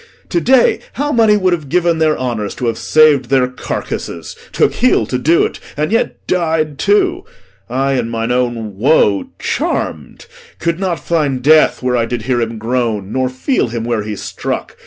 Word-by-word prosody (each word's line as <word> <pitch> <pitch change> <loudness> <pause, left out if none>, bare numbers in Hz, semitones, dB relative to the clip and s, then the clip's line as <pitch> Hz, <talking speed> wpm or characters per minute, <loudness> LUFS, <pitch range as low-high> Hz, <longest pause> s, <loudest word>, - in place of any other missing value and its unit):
To 170 - 0
day 255 +3 +4
how 290 +2 -2
many 220 -5 +4
would 185 -3 +2
have 155 -5 -4
given 170 0 +1
their 155 -1 +2
honours 115 -5 -3
To 125 - -4
have 115 -1 -1
sav'd 155 -4 +4
their 130 0 +2
carcasses! 125 - -5 0.2
took - - +2
heel 245 - +2
to 125 +3 -2
do't, 165 +6 +2 0.2
And 150 +5 -1
yet 230 - -1
died 160 -4 -1
too! 380 -3 +2 0.5
I, 135 +3 0
in 115 - -3
mine 115 +1 -2
own 120 -5 -2
woe 105 -5 +3
charm'd, 75 -5 -3 0.3
Could 170 +1 -2
not 185 -3 -1
find 145 -6 -1
death 155 -2 +4
where 125 0 +1
I 115 -1 +1
did 120 -2 -4
hear 120 0 0
him 115 0 -3
groan, 110 -3 -2
Nor 130 -1 0
feel 130 - -1
him 115 -1 -4
where 115 -2 -1
he 105 0 -5
struck. - - -5
130 Hz, 180 wpm, -16 LUFS, 115-170 Hz, 0.5 s, day